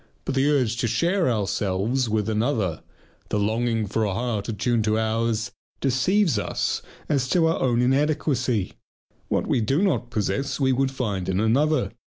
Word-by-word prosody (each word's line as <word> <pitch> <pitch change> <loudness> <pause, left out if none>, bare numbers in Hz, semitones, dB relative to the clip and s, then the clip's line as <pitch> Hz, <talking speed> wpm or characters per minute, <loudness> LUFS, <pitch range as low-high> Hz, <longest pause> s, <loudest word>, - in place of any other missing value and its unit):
But - - -2
the 135 +2 +2
urge 125 -6 +1
to 120 - 0
share 170 - +1
ourselves 105 +3 0
with 105 -1 0
another, 110 - 0 0.5
the - - 0
longing 110 +2 0
for 110 +2 -1
a 100 -3 -1
heart 115 -3 -2
attuned 115 +2 0
to 110 0 +2
ours 110 +1 0 0.3
deceives 140 - +2
us - - -1 0.3
as 135 -4 0
to 170 -2 +3
our 165 0 +1
own 120 -2 +2
inadequacy. 135 - +1 0.5
What - - 0
we 120 - +1
do 135 - +1
not 150 -11 0
possess 135 +7 -2
we 135 -2 +3
would 135 +1 +1
find 105 -9 -3
in 95 0 0
another. 135 +6 +2
120 Hz, 165 wpm, -24 LUFS, 110-135 Hz, 0.5 s, to